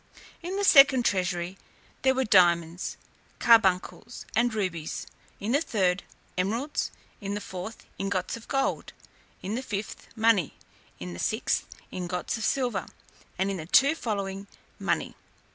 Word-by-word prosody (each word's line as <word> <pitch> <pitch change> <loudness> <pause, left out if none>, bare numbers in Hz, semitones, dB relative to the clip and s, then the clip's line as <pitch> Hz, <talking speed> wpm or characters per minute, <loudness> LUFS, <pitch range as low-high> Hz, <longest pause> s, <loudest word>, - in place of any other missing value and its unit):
In 355 +3 -4
the 405 - 0
second 275 -8 +7
treasury, 180 -1 -1 0.4
there 265 0 +3
were 265 - +2
diamonds, 175 -5 +3 0.4
carbuncles, 225 +1 +3
and 235 +1 +3
rubies; 185 -7 -3 0.3
in 210 +3 -2
the 285 +4 +3
third, 190 - +1 0.4
emeralds; 230 +11 -1 0.3
in 200 -1 -4
the - - -2
fourth, 190 +3 -7
ingots 195 -2 -1
of 230 - -11
gold; 270 -1 -1 0.5
in 195 +3 -3
the 245 - -1
fifth, 210 -5 -5
money; 220 - +3 0.4
in 90 0 -6
the 85 - -8
sixth, - - 0 0.2
ingots 180 +2 -3
of 225 - -5
silver; 245 -7 0 0.5
and 190 +2 0
in 195 - -3
the 160 -2 -7
two 275 - +5
following, 200 -8 -3 0.3
money. - - -1
200 Hz, 140 wpm, -27 LUFS, 180-240 Hz, 0.5 s, second